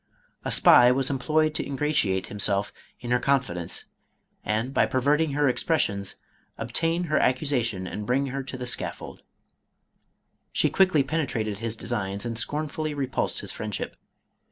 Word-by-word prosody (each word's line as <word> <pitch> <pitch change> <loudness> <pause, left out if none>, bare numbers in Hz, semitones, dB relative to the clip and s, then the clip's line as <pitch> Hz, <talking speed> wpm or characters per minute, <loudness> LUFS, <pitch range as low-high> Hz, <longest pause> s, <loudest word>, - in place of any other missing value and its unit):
A - - -3
spy 125 0 +7
was 135 +1 +1
employed 155 +3 +1
to - - -2
ingratiate 135 -10 0
himself 100 0 -1 0.3
in 120 -1 -5
her 125 - +4
confidence 120 -11 -1 0.6
and 110 +5 -1
by - - +3
pervert 140 +4 +2
ing 155 -3 0
her 145 0 +2
expressions, 105 - 0 0.4
obtain 165 +9 -1
her 155 -3 +1
accusation 125 -7 0
and 105 +3 -5
bring 135 +3 +2
her 140 - -2
to 130 - -6
the 125 - -5
scaffold. 125 - -3 1.3
She - - +2
quickly 185 -7 +4
.penetrated 125 -9 -2
his 115 0 -2
designs 100 -2 -3
and 115 -1 -3
scornfully 150 +4 -2
repulsed 135 -2 -1
his - - -3
friendship. 105 -2 -4
130 Hz, 145 wpm, -26 LUFS, 110-150 Hz, 1.3 s, spy